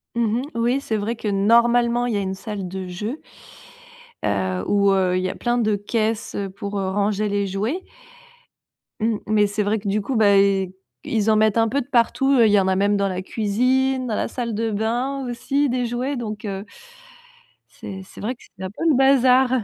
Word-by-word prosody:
Mmh 230 0 +1
mh, - - -5
oui, 240 +4 +1
c'est 220 -5 -2
vrai 215 +3 -2
que, 220 - -6
normalement, 235 +4 +3
il 240 - -1
y 205 - +1
a - - 0
une 190 0 -2
salle 200 -2 -6
de 190 0 -6
jeu 210 - -5 1.0
heu, 95 -2 -1
où, 200 -1 +3
heu, 185 -2 +2
il 185 - -1
y 185 - 0
a - - -5
plein 240 0 -1
de 215 -2 +2
caisses, 220 +2 -2
heu, 200 -1 -3
pour, 200 +1 -5
heu, 190 -1 -1
ranger 205 +1 0
les 200 0 0
jouets 215 - -2 1.2
mmh, 220 -1 +1
mais 210 -1 +3
c'est 205 +1 -1
vrai 210 +2 0
que 200 - -7
du 205 +1 +1
coup, 255 +5 -3
bah, 205 -2 +5
i 195 -2 +2 0.4
ils 220 -2 +1
en 215 - +4
mettent 215 0 +3
un 225 0 +3
peu 275 +5 0
de 250 - -10
partout, 270 +2 +2
il 220 -2 +5
y 205 - +5
en 190 - +1
a 190 - +2
même 200 +2 +2
dans 200 0 +1
la 185 -1 -3
cuisine, 255 +6 0
dans 215 - -1
la - - -1
salle 235 -3 -4
de 225 +1 -1
bain 245 +6 -1
aussi, 275 +4 0
des 250 0 0
jouets, 250 +3 -2
donc 215 -3 -5
heu 195 0 -5 1.1
c'est 190 -1 -8
c'est 190 - -13
vrai 240 +5 -2
que - - -27
c'est 190 - -9
un 185 - -3
peu 325 - -6
le 290 - +4
bazar! 260 -1 +5
215 Hz, 220 wpm, -22 LUFS, 200-240 Hz, 1.2 s, bah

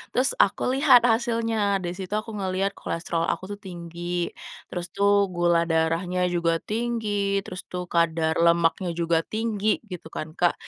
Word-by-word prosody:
Terus 255 +2 +3
aku - - +2
lihat 270 -4 +7
hasilnya, 225 -3 +1
di 175 - -2
situ 190 +1 -6
aku 215 0 -3
ngeliat 190 +1 0
kolesterol 165 0 -2
aku - - -2
tuh - - -34
tinggi, 175 -1 -4 0.4
terus 175 -1 -4
tuh 200 0 +4
gula 175 -1 +2
darahnya 165 +3 +1
juga 170 -1 +1
tinggi, 210 -3 -1
terus 180 -1 -8
tuh 180 0 -4
kadar 165 -1 +1
lemaknya 170 +1 +3
juga 165 -1 +1
tinggi 215 -1 0
gitu 180 -3 -7
kan 155 - -4
Kak, 175 -1 +4
180 Hz, 150 wpm, -25 LUFS, 170-210 Hz, 0.4 s, lihat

